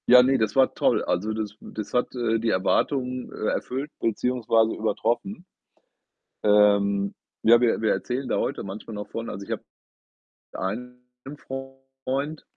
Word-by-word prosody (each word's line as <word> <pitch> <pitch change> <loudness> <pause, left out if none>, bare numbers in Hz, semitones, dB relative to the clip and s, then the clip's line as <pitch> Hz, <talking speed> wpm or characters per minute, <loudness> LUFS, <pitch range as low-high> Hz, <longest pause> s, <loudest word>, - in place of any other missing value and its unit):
Ja, 125 0 +9
ne, 135 +1 +3
das 110 -3 0
war 135 -1 +4
toll. - - +2
Also, 105 +5 -1
das, 110 -2 -3
äh - - -22
das 105 -1 -7
hat, 125 - +1
äh, 115 -2 +1
die 115 +1 0
Erwartungen, 125 +6 0
äh, 110 - -2
erfüllt 135 +4 -3
beziehungsweise 115 -1 +1
übertroffen. 145 - -1 1.0
Ähm, 100 -1 +4 0.3
ja, 120 +1 +7
wir 120 -2 +2
wir 110 - +2
erzählen 130 +2 -2
da - - +1
heute - - -2
manchmal 100 +3 -7
noch 105 0 -6
von. 115 +2 -5
Also, 100 - -6
ich - - -5
habe - - -3 0.9
einen 125 +6 -4 0.4
Freund 135 +2 -5
115 Hz, 155 wpm, -25 LUFS, 105-130 Hz, 1.0 s, Ja